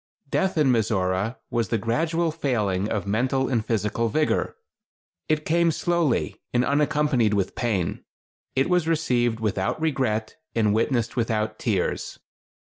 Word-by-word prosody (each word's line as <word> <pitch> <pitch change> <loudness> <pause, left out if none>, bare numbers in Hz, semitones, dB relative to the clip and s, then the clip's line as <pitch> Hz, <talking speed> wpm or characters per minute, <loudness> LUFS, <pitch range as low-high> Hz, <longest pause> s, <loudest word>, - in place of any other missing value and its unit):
Death 190 -3 +1
in 145 -4 +4
Mizora 105 -1 0
was 115 -4 0
the 115 - +1
gradual 160 +10 0
failing 110 - -1
of 105 -4 -2
mental 130 +6 +1
and 120 -4 0
physical 110 +1 0
vigor. 155 +7 0 0.7
It 155 0 +1
came 170 +1 +3
slowly, 165 -4 0
and 125 +1 +2
unaccompanied 145 -6 +2
with 100 -2 0
pain. 100 -8 -1 0.5
It 135 - +2
was 180 -2 +2
received 120 -8 +1
without 100 +1 -1
regret, 130 -9 -1 0.2
and 105 -3 +3
witnessed 115 +1 0
without 110 -3 -1
tears. 100 -6 -1
120 Hz, 135 wpm, -25 LUFS, 110-150 Hz, 0.7 s, in